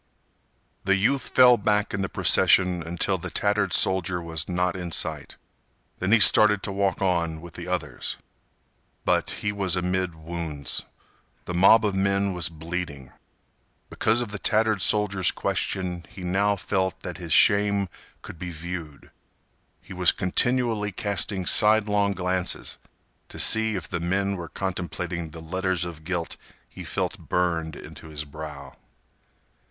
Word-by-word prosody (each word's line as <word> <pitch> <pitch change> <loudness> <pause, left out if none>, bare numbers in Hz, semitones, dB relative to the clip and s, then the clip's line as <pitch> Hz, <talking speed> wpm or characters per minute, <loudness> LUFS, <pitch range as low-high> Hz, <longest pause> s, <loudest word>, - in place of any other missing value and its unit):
The 100 0 +3
youth 130 +8 0
fell 125 -1 +7
back 105 0 0
in 100 - -2
the 95 - -2
procession 90 -2 +3
until 85 +3 -2
the 95 +1 -6
tattered 100 +3 0
soldier 95 -1 +3
was 80 -1 -4
not 90 0 0
in 90 -2 -6
sight. - - -3 0.6
Then 90 +3 -1
he 115 - +6
started 105 -1 +6
to - - -3
walk 100 -1 -1
on 85 -4 0
with 85 0 -12
the 85 +3 -8
others. 90 -5 -3 0.9
But - - +1
he 105 - -3
was 95 -3 0
amid 90 -1 -1
wounds. 80 -3 -5 0.6
The 90 - -5
mob 100 +5 +5
of 105 - 0
men 100 0 0
was 90 -3 -1
bleeding. 80 -5 -6 0.8
Because 115 +2 +1
of 115 -4 -5
the 105 - -5
tattered 110 -1 +1
soldier's 100 -2 +3
question 90 -2 -2
he 95 - -10
now 100 +3 +1
felt 95 -1 -2
that - - -7
his - - -7
shame 100 -1 +4 0.4
could 85 - -10
be 90 0 -5
viewed. 85 -3 -8 0.7
He 95 - -10
was 90 -1 +4
continually 110 +2 0
casting 100 -1 -2
sidelong 105 0 +3
glances 90 -1 -2 0.5
to - - -10
see 110 -1 +5
if 90 - -5
the - - -3
men 95 +3 -1
were 85 -3 -7
contemplating 90 -2 -4
the 80 +1 -10
letters 95 +1 -1
of 80 -3 -9
guilt 85 0 -3 0.3
he - - -10
felt - - -3
burned 85 -3 -1
into - - -11
his 75 -1 -4
brow. 75 -1 -9
90 Hz, 145 wpm, -25 LUFS, 85-100 Hz, 0.9 s, fell